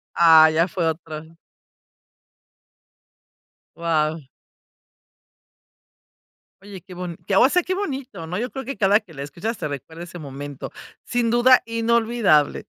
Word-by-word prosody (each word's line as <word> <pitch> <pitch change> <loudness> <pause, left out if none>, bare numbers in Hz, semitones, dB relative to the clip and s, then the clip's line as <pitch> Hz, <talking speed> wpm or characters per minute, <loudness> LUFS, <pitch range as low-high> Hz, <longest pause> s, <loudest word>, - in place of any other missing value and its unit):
Ah, 160 -2 +7
ya 165 +3 +2
fue 170 -1 -2
otro. 160 0 -6 2.4
Wao. 160 -1 -1 2.4
Oye, 195 -3 -11
qué 185 -1 -13
bon 175 -2 -6
qué, 195 - 0
o 255 - +6
sea, 360 +2 +2
qué 370 +2 -3
bonito, 275 - -5
¿no? 180 +4 -4
Yo 245 +2 -3
creo 265 -2 -7
que 275 +2 -6
cada 205 0 +4
que 190 -7 -18
la 140 - -8
escuchas 170 +11 -5
te - - -3
recuerda 150 +4 -8
ese 175 0 -10
momento. 145 -2 -8 0.3
Sin 240 -1 -1
duda 245 +2 +5
inolvidable. 230 -8 +1
180 Hz, 130 wpm, -22 LUFS, 160-235 Hz, 2.4 s, Ah